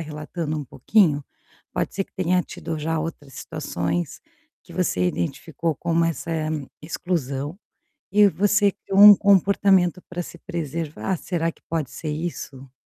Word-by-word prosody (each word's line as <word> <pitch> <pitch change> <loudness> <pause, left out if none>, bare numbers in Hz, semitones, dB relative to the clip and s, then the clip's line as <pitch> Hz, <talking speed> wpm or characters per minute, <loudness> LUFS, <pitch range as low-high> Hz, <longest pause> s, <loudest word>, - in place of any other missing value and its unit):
relatando 155 0 -4
um 145 - -5
pouquinho, 145 - +2 0.5
pode - - -2
ser 195 - 0
que - - -16
tenha 180 0 +2
tido 160 -2 -6
já 160 +1 -1
outras 150 -4 -6
situações, 90 - -3 0.4
que - - -14
você 90 0 +1
identificou 145 - -2
como 170 0 +1
essa 165 0 -2 0.5
exclusão 155 -2 -3 0.6
e 205 0 +7
você 205 +1 +3
criou 195 +1 -1
um 205 -1 +12
comportamento 195 -2 +4
para 175 0 -4
se - - -11
preservar, 165 +1 -3
será 165 -1 -1
que - - -19
pode 160 -5 -2
ser 155 - -6
isso? 150 -4 -5
165 Hz, 140 wpm, -23 LUFS, 150-185 Hz, 0.6 s, um